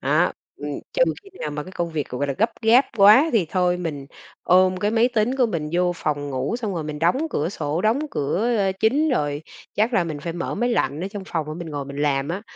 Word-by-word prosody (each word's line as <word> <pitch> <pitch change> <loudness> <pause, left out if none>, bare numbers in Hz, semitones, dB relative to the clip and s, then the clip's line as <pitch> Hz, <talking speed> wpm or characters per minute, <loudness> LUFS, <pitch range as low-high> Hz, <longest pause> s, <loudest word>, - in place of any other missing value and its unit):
À, - - +2 0.2
ừm, - - -6 0.2
trừ - - +2 0.2
khi 395 - -16
nào 150 - -3
mà 150 0 -4
cái 185 - -11
công 170 -2 -3
việc, 155 -3 -3
gọi 135 +3 -2
là, 140 - -1
gấp 225 +2 +3
gáp 240 +5 +6
quá 215 +10 +7
thì 200 -8 +2
thôi 180 -1 +2
mình 150 -6 -5 0.4
ôm 185 +1 +4
cái 205 +3 0
máy 230 +2 +3
tính 245 +1 0
của 250 -3 +3
mình 160 -7 -3
vô 180 0 +2
phòng 145 -2 -2
ngủ 135 - -2
xong 215 -6 -3
rồi 160 -3 -3
mình 150 -1 -5
đóng 255 - +2
cửa 155 +3 -1
sổ, 155 -2 -2
đóng 220 +5 +3
cửa, 205 +12 0
ơ, 195 -2 +1
chính 285 +8 +3
rồi, 145 - -1 0.3
chắc 220 +4 +1
là 180 - +2
mình 155 -3 -4
phải 165 +2 -4
mở 175 - -4
máy 245 +1 0
lạnh 155 -9 0
ở 185 - -3
trong 200 0 -7
phòng 160 -3 -2
để 155 - -5
mình 170 -2 -7
ngồi 145 -2 -4
mình 140 0 -8
làm 140 -1 0
á, 190 +5 -3
180 Hz, 255 wpm, -23 LUFS, 150-220 Hz, 0.4 s, quá